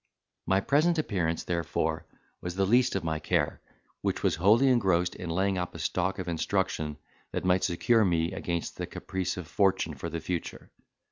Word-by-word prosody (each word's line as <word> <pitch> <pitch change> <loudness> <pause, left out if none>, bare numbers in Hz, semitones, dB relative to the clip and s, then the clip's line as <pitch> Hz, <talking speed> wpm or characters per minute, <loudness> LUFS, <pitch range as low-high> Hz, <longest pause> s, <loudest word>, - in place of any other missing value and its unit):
My 95 +1 +3
present 155 - +3
appearance, 90 - -1
therefore, 85 -2 -1 0.3
was 90 0 -5
the 95 0 +2
least 120 +4 +3
of 95 - -1
my 80 -1 -1
care, 75 - 0 0.4
which - - -1
was - - +2
wholly 110 +10 +5
engrossed 95 -9 +3
in 90 - -6
laying 95 +2 +1
up 90 -1 -4
a - - -5
stock 90 +4 -1
of 95 - -5
instruction 85 -3 -1 0.4
that - - -2
might 90 0 +3
secure 110 +6 +3
me 85 -3 +1
against 85 -1 -3
the - - -4
caprice 95 -1 -3
of 90 - -5
fortune 95 -5 +1
for 75 +4 -5
the 85 +1 -3
future. 85 +1 -5
90 Hz, 180 wpm, -29 LUFS, 85-100 Hz, 0.4 s, wholly